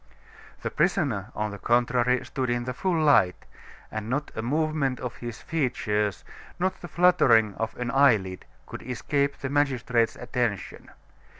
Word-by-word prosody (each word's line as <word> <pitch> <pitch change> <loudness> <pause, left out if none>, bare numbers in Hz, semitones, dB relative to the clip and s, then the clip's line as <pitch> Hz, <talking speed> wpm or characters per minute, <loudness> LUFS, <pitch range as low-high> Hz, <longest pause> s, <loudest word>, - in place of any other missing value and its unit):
The - - -2
prisoner, 140 - 0
on 105 0 -2
the 100 - -8
contrary, 120 +2 +2
stood 130 -2 -3
in 120 0 0
the 125 +1 -4
full 175 +5 0
light, 140 - +3 0.5
and 110 0 -5
not 145 +4 -2
a - - -2
movement 145 0 0
of 125 - -5
his 120 -2 -7
features, 105 - -1 0.3
not 185 +1 -1
the 175 - -7
fluttering 120 - +4
of 110 +3 -4
an 125 0 -2
eyelid 110 -10 +3 0.2
could - - -8
escape 140 +3 -1
the 135 - -4
magistrate's 125 -5 +1
attention. 120 -5 -3
125 Hz, 145 wpm, -26 LUFS, 110-145 Hz, 0.5 s, fluttering